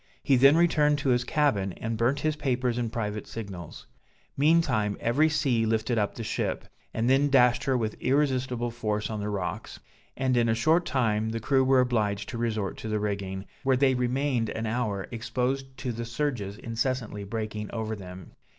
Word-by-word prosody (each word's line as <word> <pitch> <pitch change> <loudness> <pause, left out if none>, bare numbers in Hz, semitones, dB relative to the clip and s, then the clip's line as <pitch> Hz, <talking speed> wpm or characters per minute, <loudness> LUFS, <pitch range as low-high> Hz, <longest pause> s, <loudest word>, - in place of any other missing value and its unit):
He 135 - +4
then 135 +4 +6
returned 150 -3 +3
to 145 -1 -1
his 125 -1 +3
cabin, 115 - +1
and 115 +4 -4
burnt 125 +6 +1
his 155 -1 0
papers 125 -4 -1
and 115 -2 -2
private 105 -2 -3
signals. 95 -7 -8 0.5
Meantime 140 - +2
every 145 +7 +2
sea 140 -7 +1
lifted 110 +1 0
up 105 -1 -1
the 115 - -5
ship, - - -2 0.3
and 115 +1 -1
then 135 +3 +4
dashed 125 -3 +4
her 135 -1 +2
with 110 -2 -3
irresistible 130 -3 0
force 105 -2 -2
on 110 - -3
the 105 +1 -3
rocks; 95 -4 -4 0.4
and 130 -1 +1
in 120 -1 +3
a 110 - +2
short 160 +8 +2
time, 110 -5 +1
the 115 +1 -3
crew 130 +4 +2
were 130 0 +4
obliged 105 -5 0
to 120 - -5
resort 110 -4 -2
to - - -6
the 110 -1 -1
rigging, 100 -2 -3 0.2
where 135 -2 +2
they 135 0 +4
remained 125 -1 0
an 110 - -3
hour, 110 -4 -2
exposed 130 +3 -2
to 130 -2 -3
the 115 0 -4
surges 120 -6 -3
incessantly 115 -2 -3
breaking 105 0 -4
over 110 -1 -3
them. 90 -2 -10
120 Hz, 185 wpm, -27 LUFS, 110-135 Hz, 0.5 s, then